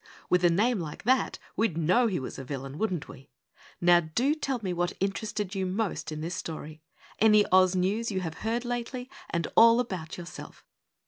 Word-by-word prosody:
With 180 Hz, 0 st, +4 dB
a 175 Hz, -, +6 dB
name 210 Hz, +6 st, +2 dB
like 155 Hz, -3 st, -6 dB
that, 260 Hz, +3 st, +2 dB, 0.2 s
we'd 215 Hz, -8 st, 0 dB
know 185 Hz, +10 st, +3 dB
he 190 Hz, -7 st, -1 dB
was 130 Hz, -, -6 dB
a -, -, -6 dB
villain, 135 Hz, +1 st, -6 dB
wouldn't 185 Hz, -8 st, -1 dB
we? 135 Hz, 0 st, -13 dB, 0.5 s
Now 175 Hz, 0 st, +6 dB
DO 225 Hz, -, 0 dB
tell 275 Hz, -5 st, -2 dB
me 185 Hz, -2 st, -1 dB
what 175 Hz, 0 st, -1 dB
interested 200 Hz, 0 st, -2 dB
you 190 Hz, -2 st, -1 dB
most 195 Hz, -2 st, -2 dB
in 155 Hz, 0 st, -5 dB
this 170 Hz, +3 st, -3 dB
story; 155 Hz, -3 st, -6 dB, 0.4 s
any 215 Hz, -1 st, +6 dB
Oz 185 Hz, 0 st, +5 dB
news 200 Hz, +6 st, 0 dB
you 190 Hz, -3 st, -2 dB
have 160 Hz, -2 st, -5 dB
heard 230 Hz, +2 st, -2 dB
lately 245 Hz, +1 st, -4 dB, 0.2 s
and 170 Hz, -1 st, -1 dB
all 230 Hz, +1 st, +7 dB
about 185 Hz, -9 st, -4 dB
yourself! 175 Hz, 0 st, -10 dB
185 Hz, 190 wpm, -28 LUFS, 170-225 Hz, 0.5 s, all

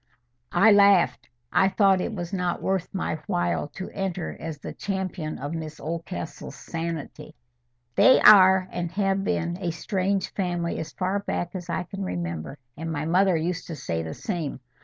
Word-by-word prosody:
I 200 Hz, +5 st, +7 dB
laughed. 200 Hz, -10 st, +4 dB, 0.2 s
I 190 Hz, -, +4 dB
thought 195 Hz, -2 st, +3 dB
it -, -, -2 dB
was 175 Hz, -1 st, -5 dB
not 180 Hz, -2 st, -1 dB
worth 190 Hz, -2 st, -1 dB
my 180 Hz, -4 st, -2 dB
while 85 Hz, -, 0 dB
to 190 Hz, -, -6 dB
enter 190 Hz, -3 st, -3 dB
as 160 Hz, -2 st, -5 dB
the -, -, -7 dB
champion 190 Hz, -5 st, -3 dB
of 145 Hz, +3 st, -5 dB
Miss 155 Hz, -2 st, -6 dB
Oldcastle's 165 Hz, +1 st, -6 dB
sanity. 165 Hz, -2 st, -6 dB, 0.6 s
"They 260 Hz, -, +6 dB
are, 190 Hz, -2 st, +8 dB
and 175 Hz, -1 st, -3 dB
have 195 Hz, 0 st, +1 dB
been, 175 Hz, -1 st, -1 dB
a 175 Hz, -, -1 dB
strange 190 Hz, +3 st, -1 dB
family 175 Hz, -3 st, -2 dB
as 160 Hz, -, -5 dB
far 190 Hz, +2 st, -1 dB
back 175 Hz, -3 st, -3 dB
as 180 Hz, -2 st, -7 dB
I 170 Hz, +2 st, -1 dB
can 195 Hz, +2 st, -6 dB
remember; 85 Hz, -, -4 dB, 0.2 s
and 165 Hz, +2 st, -5 dB
my 150 Hz, -1 st, -2 dB
mother 180 Hz, +2 st, +3 dB
used 170 Hz, +2 st, -2 dB
to 165 Hz, -, -5 dB
say 80 Hz, -, -3 dB
the 80 Hz, -1 st, -6 dB
same. 170 Hz, -, -4 dB
175 Hz, 170 wpm, -25 LUFS, 160-190 Hz, 0.6 s, are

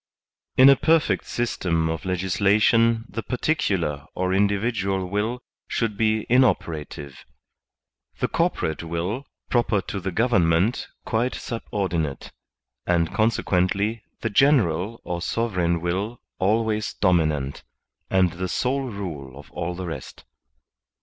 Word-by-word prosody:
In 130 Hz, -, +9 dB
a 140 Hz, -, +9 dB
perfect 160 Hz, +3 st, +2 dB
system 90 Hz, -9 st, 0 dB
of 80 Hz, +2 st, -3 dB
legislation 105 Hz, +5 st, +3 dB
the 115 Hz, -, -5 dB
particular 95 Hz, -, -1 dB
or 95 Hz, 0 st, 0 dB
in 100 Hz, +2 st, +4 dB
dividual 100 Hz, -2 st, -1 dB
will 110 Hz, +6 st, -2 dB, 0.2 s
should 115 Hz, -3 st, -1 dB
be 110 Hz, 0 st, +1 dB
inoperative; 80 Hz, -, 0 dB, 0.9 s
the -, -, 0 dB
corporate 80 Hz, -, 0 dB
will 90 Hz, +10 st, -3 dB, 0.2 s
I)roper 115 Hz, -5 st, +2 dB
to 100 Hz, -, -4 dB
the 95 Hz, +1 st, -3 dB
goverment 95 Hz, -1 st, +2 dB, 0.2 s
quite 120 Hz, +3 st, 0 dB
subordinate; 90 Hz, -, -3 dB, 0.6 s
and 85 Hz, -2 st, +2 dB
conse 110 Hz, 0 st, +1 dB
quently 100 Hz, +5 st, +1 dB, 0.2 s
the 110 Hz, -, -1 dB
general 110 Hz, -, +3 dB
or 85 Hz, -1 st, -4 dB
sovereign 90 Hz, -7 st, 0 dB
will 95 Hz, +7 st, -2 dB, 0.2 s
always 110 Hz, +2 st, +1 dB
dominant, 75 Hz, -7 st, +1 dB, 0.5 s
and 95 Hz, -2 st, +3 dB
the 90 Hz, +1 st, -3 dB
sole 135 Hz, +8 st, 0 dB
rule 85 Hz, -, -6 dB
of 75 Hz, -1 st, -13 dB
all 85 Hz, +1 st, -3 dB
the 95 Hz, 0 st, -5 dB
rest. 80 Hz, -6 st, -7 dB
95 Hz, 120 wpm, -24 LUFS, 85-115 Hz, 0.9 s, In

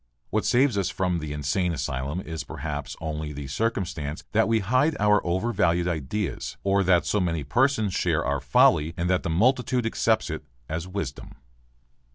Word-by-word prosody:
What -, -, 0 dB
saves 125 Hz, -4 st, +3 dB
us 95 Hz, -, 0 dB
from 90 Hz, -2 st, -1 dB
the 75 Hz, -2 st, -5 dB
insane 75 Hz, +5 st, 0 dB
asylum 70 Hz, +3 st, -3 dB
is 80 Hz, -3 st, -5 dB
perhaps 75 Hz, -2 st, -5 dB
only 75 Hz, -1 st, -4 dB
the 70 Hz, 0 st, -6 dB
circumstance 85 Hz, -3 st, -2 dB
that 110 Hz, +1 st, +3 dB
we 115 Hz, 0 st, +3 dB
hide 130 Hz, +9 st, +2 dB
our 105 Hz, 0 st, +4 dB
overvalued 90 Hz, -2 st, +1 dB
ideas 85 Hz, +4 st, -3 dB
or 100 Hz, 0 st, +2 dB
that 90 Hz, -1 st, +4 dB
so 105 Hz, -, +1 dB
many 85 Hz, -5 st, -1 dB
persons 110 Hz, -, +1 dB
share -, -, +1 dB
our -, -, 0 dB
folly 80 Hz, +2 st, +3 dB
and 85 Hz, 0 st, -1 dB
that 90 Hz, -, +2 dB
the 95 Hz, -, -3 dB
multitude 125 Hz, +6 st, +2 dB
accepts 110 Hz, -3 st, +1 dB
it 80 Hz, -, -5 dB, 0.2 s
as 80 Hz, +3 st, -4 dB
wisdom. 95 Hz, -8 st, -5 dB
90 Hz, 170 wpm, -26 LUFS, 75-105 Hz, 0.2 s, our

